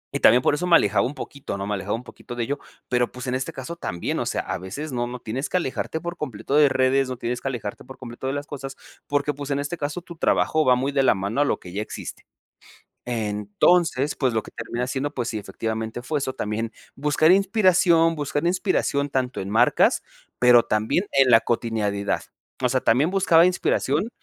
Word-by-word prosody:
y - - 0
también, 125 +1 +6
por - - +3
eso 170 +5 -1
me 170 - +6
alejaba 105 -6 +3
un 140 - -7
poquito, 140 -7 -6
¿no? 100 - -4
Me 105 - -2
alejaba 100 +1 -2
un 115 - -7
poquito 125 0 -10
de 120 - -1
ello, 140 +5 -3 0.3
pero, 125 -1 +1
pues, 125 +1 -8
en 125 - -2
este 130 +1 -2
caso, 150 +6 -7
también, 85 - -3
o - - -2
sea, - - -1
a - - -4
veces, 120 - -6
no 120 -1 -1
no 125 +1 -6
tienes 125 +5 -4
que - - +1
alejarte 160 0 -3
por 175 +1 -6
completo 135 -2 -3
de 150 -1 +6
redes, 130 0 +2
no 130 - -4
tienes 120 +1 -3
que - - -4
alejarte 115 -6 -5
por 130 +1 -12
completo 125 +1 -7
de 135 - -1
las 145 0 -4
cosas, 135 -3 -7 0.3
porque, 145 +1 0
pues, 145 0 -7
en 140 - 0
este 145 +4 -3
caso, 150 +2 -4
tu 170 0 -11
trabajo 155 -1 +2
va 125 - +5
muy 135 +3 -1
de 140 -1 +2
la 130 - +4
mano 100 +8 -1
a - - +4
lo - - 0
que 90 - -11
ya 100 - -2
existe. 110 - -8 0.8
Entonces, 120 - +1
pues, 130 -3 0
lo 110 -1 -1
que - - -12
termina 120 +1 -4
siendo, 140 +2 -2
pues, 125 -4 -3
sí 110 - -3
efectivamente 110 +2 -4
fue 145 +3 -2
eso, 130 -1 -3
también 110 +2 -3 0.2
buscar 150 +4 +3
inspiración 185 -4 +4
buscar 145 +1 -2
inspiración 175 -6 +1
tanto 130 -1 -1
en 95 - -5
marcas, 115 +4 +3 0.4
pero, 125 -1 +6
también 110 - 0
en 130 -2 +5
la 115 - +8
cotidianidad. 105 -4 -1 0.4
O - - +3
sea, - - +1
también 135 +9 +3
buscaba 185 -4 +5
inspiración 175 -1 +1
130 Hz, 220 wpm, -24 LUFS, 115-150 Hz, 0.8 s, la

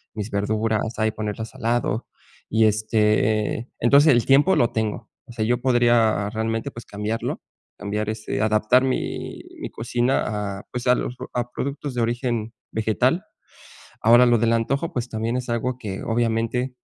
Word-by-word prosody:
mis 105 0 -5
verduras, 110 +2 0 0.2
ahí 110 0 +1
ponerlas 110 +1 -5
a - - -12
lado 115 -1 0 0.4
y, 110 0 +3
este, 110 0 +2
eh 120 - -9
entonces 140 +6 +6
el 120 -1 +2
tiempo 145 +8 +5
lo 120 - +2
tengo. 110 0 -3 0.2
O - - -11
sea, 110 -2 -1
yo 120 +1 +1
podría 120 -5 +3
realmente, 115 +4 -2
pues 120 - -10
cambiarlo, 105 +2 -3 0.4
cambiar 105 +1 -3
ese, 110 0 -3
adaptar 110 +4 +3
mi 130 -1 -3 0.2
mi - - -5
cocina 110 -4 -1
a - - -12
pues, 125 0 -4
a 125 - +6
los 125 - -3 0.2
a 120 0 -2
productos 140 0 -4
de 120 - -1
origen 115 -1 -1 0.2
vegetal. 120 - +1 0.8
Ahora 120 +3 +6
lo 120 -1 +4
del 115 +1 +2
antojo, 140 +8 -1
pues, 125 -1 -2
también 115 +2 -2
es 125 -1 -4
algo 120 +2 -1
que 100 -5 -5
obviamente, 115 +2 0
115 Hz, 165 wpm, -23 LUFS, 110-125 Hz, 0.8 s, entonces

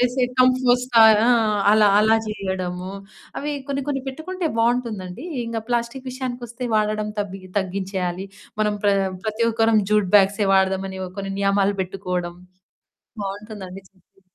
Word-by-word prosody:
వేసే 250 +1 +2
కంపోస్టా 250 -1 +4 0.3
ఆ! - - +4 0.4
అలా 215 0 +5
అలా 220 +1 +4
చేయడము, 185 -3 -4 0.5
అవి 295 +1 -3 0.2
కొన్ని 280 0 -2
కొన్ని 280 -2 -1
పెట్టుకుంటే 335 +6 -4
బాగుంటుందండి. 230 - -1 0.2
ఇంక 230 0 -3
ప్లాస్టికు 240 +2 -2
విషయానికొస్తే 250 -1 -5
వాడడం 215 0 0
తబ్బి 195 -1 -5 0.2
తగ్గించేయాలి. 190 -1 -3 0.3
మనం 210 -1 +1
ప్ర 205 - +5 0.3
ప్రతి 220 +2 0
ఒక్కరం 225 -1 +3
జూట్ 210 -3 +2
బ్యాగ్సే 200 +1 +3
వాడదాం 190 0 +2
అని 190 0 -7 0.2
కొన్ని 195 0 -4
నియమాలు 200 0 +2
పెట్టుకోవడం, 180 -2 -4 0.9
బాగుంటుందండి 195 -1 -7
చక్కగా. 195 0 -32
210 Hz, 125 wpm, -22 LUFS, 190-245 Hz, 0.9 s, అలా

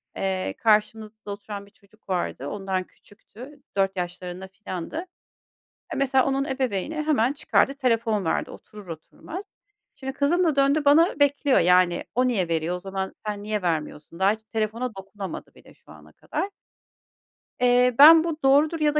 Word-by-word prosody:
Eee, 190 -1 -2
karşımızda 215 -1 0
oturan 200 0 -7
bir 200 - -21
çocuk 200 +1 -26
vardı, 175 -6 -2
ondan 195 -1 -3
küçüktü, 245 +9 -15 0.2
4 195 0 +1
yaşlarında 180 +1 -5
filandı. 190 - -6 0.9
Mesela 265 -1 +2
onun 275 0 0
ebeveyni 265 0 -2
hemen 300 -5 +1
çıkardı 275 -1 +1
telefon 230 -6 0
verdi, 160 - -1
oturur 210 -3 -13
oturmaz. 310 - -9 0.5
Şimdi 265 0 -6
kızım 295 +6 +2
da 320 -4 +2
döndü 280 +2 +2
bana 305 +3 +4
bekliyor 285 -1 +3
yani, 180 0 +3
"O 255 0 +3
niye 195 -8 0
veriyor, 165 +1 -1
o 180 - -6
zaman 190 0 -5
sen 205 -1 -4
niye 210 -1 -2
vermiyorsun?" 160 -1 -3
daha 195 +2 +4
hiç 220 0 -5
telefona 220 +1 -3
dokunamadı 195 0 -8
bile - - -18
şu - - -20
ana - - -16
kadar. 395 - -4 1.1
Eee, 250 0 +4
ben 320 +2 +10
bu 330 -2 -3
doğrudur 295 +4 +4
ya 300 0 +1
da - - +4
220 Hz, 155 wpm, -24 LUFS, 190-275 Hz, 1.1 s, ben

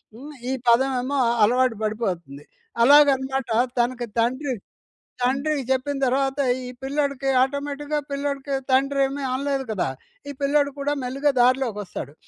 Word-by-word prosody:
హ్మ్. 285 +6 -10 0.2
ఈ - - 0
పదం 255 +3 +4
ఏమో 275 +3 -1 0.2
అలవాటు 250 +2 +3
పడిపోతుంది. 180 - -3 0.4
అలాగనమాట 270 -2 +4 0.3
తనకి 240 0 0
తండ్రి 260 +4 0 0.7
తండ్రికి 275 +3 0
చెప్పిన 265 +2 0
తరువాత 270 +2 0 0.3
ఈ - - -6
పిల్లోడికి 280 -1 -1
ఆటోమేటిక్‌గా 285 +2 -1
పిల్లోడికి 280 0 -3 0.2
తండ్రి 275 +1 +2
ఏమి 275 +1 -5
అనలేదు 275 0 -1
కదా! 210 -9 -1 0.4
ఈ - - -3
పిల్లోడు 285 0 +2
కూడా 285 +1 0
మెల్లిగా 275 +4 0
దార్లోకి 250 -2 +2
వస్తాడు. 145 -7 -7
270 Hz, 125 wpm, -23 LUFS, 250-280 Hz, 0.7 s, పదం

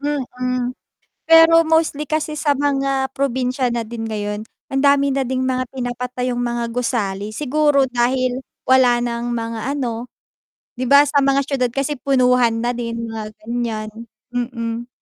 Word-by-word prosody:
Mm. 255 -3 -2 0.6
Pero 330 0 +8
mostly 315 -3 +1
kasi 310 0 -1
sa 290 -1 0
mga 275 -1 0
probinsya 260 -1 0
na 235 -1 -2
din 225 0 -5
ngayon, 210 -1 -3 0.3
ang 270 0 +1
dami 280 0 +4
na 275 - 0
ding 255 +1 -1
mga 255 0 0
pinapatayong 250 -1 -3
mga 240 -1 -1
gusali, 210 -5 -2
siguro 295 +1 +2
dahil 255 +1 0 0.2
wala 255 -2 +5
ng 240 0 -2
mga 230 -1 -3 0.2
ano, 240 -2 -3 0.7
'di 255 - -2
ba, 280 +2 +7
sa 285 0 +2
mga 275 0 +3
siyudad 260 -3 0
kasi 275 +3 -1
punuhan 250 -4 +3
na 240 - +1
din 230 -1 -4
mga 220 -1 -5 0.2
ganyan, 230 -2 -3 0.4
mm. 235 -1 -3
250 Hz, 145 wpm, -20 LUFS, 235-275 Hz, 0.7 s, Pero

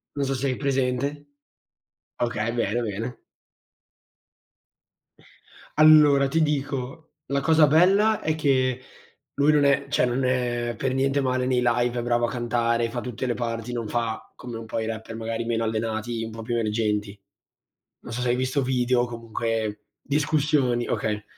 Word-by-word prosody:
Non 140 -1 -1
so 135 - 0
se 135 +2 -1
hai 130 - -1
presente. 130 -1 +1 1.2
Okay, 115 -1 -2
bene, 120 0 0
bene. 115 +2 -4 2.6
Allora, 150 -3 +6
ti 160 +4 +1
dico, 140 -1 -3
la 140 0 0
cosa 155 +1 +5
bella 195 +8 +4
è 155 0 0
che 130 -4 +1 0.5
lui 145 +2 +4
non 150 -1 +3
è 140 0 +2
cioè, 135 - +2
non 125 +2 -1
è 120 -2 -1
per 130 +3 -1
niente 135 +1 +1
male 130 -1 0
nei 125 -1 +1
live, 120 0 +1
è - - -1
bravo 120 0 +1
a - - -2
cantare, 120 -1 0
fa 120 +1 -4
tutte 125 +1 -5
le 120 - +1
parti, 115 -1 -4
non 115 -2 -3
fa 115 0 -3
come 120 -2 -8
un 115 - -8
po' 110 - -3
i 110 - -2
rapper 110 0 -6
magari 115 +1 -3
meno 115 -1 -1
allenati, 110 +1 -2
un 115 - -6
po' 115 - -8
più 120 +2 -3
emergenti. 105 -2 -1 0.8
Non 115 - -8
so 125 - -3
se 125 - 0
hai 120 - +3
visto 130 +2 0
video 125 -1 +1
o - - +1
comunque 115 -2 -3 0.2
discussioni 145 -4 +1
okay. 105 -1 -2
120 Hz, 165 wpm, -25 LUFS, 115-135 Hz, 2.6 s, Allora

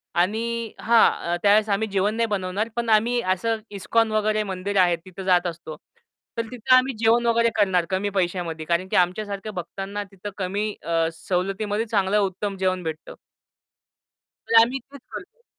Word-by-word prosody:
आणि 225 +5 0
हां, 225 -6 +3
त्यावेळेस 210 +1 +4
आम्ही 205 +2 +1
जेवण 200 +2 +1
नाही 230 0 +1
बनवणार 200 +1 -2
पण 235 -1 -2
आम्ही 230 +3 +3
असं 220 +4 0
इस्कॉन 220 +3 0
वगैरे 215 0 +1
मंदिर 195 +1 -3
आहे 175 -1 +3
तिथं 185 +3 -11
जात 180 -1 +3
असतो. 165 -2 -7 0.6
तर - - +2
तिथं 250 +1 +3
आम्ही 255 +1 +3
जेवण 230 +1 +3
वगैरे 230 0 +3
करणार 190 -5 +2
कमी 190 +2 -1
पैशामध्ये, 175 -4 -2
कारण 175 +3 0
की - - -3
आमच्या 180 +4 +2
सारख्या 205 +1 -6
भक्तांना 195 +3 -5
तिथं 195 +1 -8
कमी 200 +3 -2
अ, 165 -1 +1
सवलतीमध्ये 195 +5 -2
चांगलं 205 -2 +1
उत्तम 195 0 -2
जेवण 185 -1 0
भेटतं. 160 0 -6 1.3
तर 225 0 +8
आम्ही 250 +4 +1
तेच 280 -2 -12
करतो. 475 - -10
200 Hz, 160 wpm, -23 LUFS, 185-225 Hz, 1.3 s, तर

